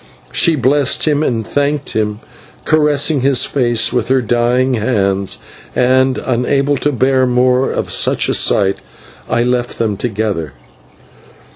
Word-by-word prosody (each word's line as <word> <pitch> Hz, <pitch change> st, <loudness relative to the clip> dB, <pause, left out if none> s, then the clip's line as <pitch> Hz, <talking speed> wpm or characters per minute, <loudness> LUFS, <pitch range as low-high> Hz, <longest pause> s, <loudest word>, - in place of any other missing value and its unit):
She 165 Hz, -2 st, +2 dB
blessed 140 Hz, +2 st, +1 dB
him 150 Hz, -1 st, +1 dB
and 115 Hz, -7 st, -1 dB
thanked 145 Hz, 0 st, -2 dB
him, 105 Hz, -1 st, -2 dB, 0.4 s
caressing 150 Hz, -2 st, +2 dB
his 135 Hz, -1 st, +2 dB
face 120 Hz, -4 st, 0 dB
with 125 Hz, -, -1 dB
her 130 Hz, +1 st, +2 dB
dying 120 Hz, +2 st, 0 dB
hands, 100 Hz, -4 st, -1 dB, 0.4 s
and, 130 Hz, +1 st, +2 dB
unable 135 Hz, +3 st, 0 dB
to 145 Hz, -, -1 dB
bear 130 Hz, 0 st, +1 dB
more 125 Hz, +1 st, +2 dB
of -, -, -3 dB
such -, -, +2 dB
a -, -, 0 dB
sight, 100 Hz, -1 st, +2 dB, 0.5 s
I 120 Hz, -, +1 dB
left 125 Hz, 0 st, -2 dB
them 110 Hz, -3 st, -1 dB
together. 105 Hz, -, -3 dB
125 Hz, 135 wpm, -15 LUFS, 115-135 Hz, 0.5 s, She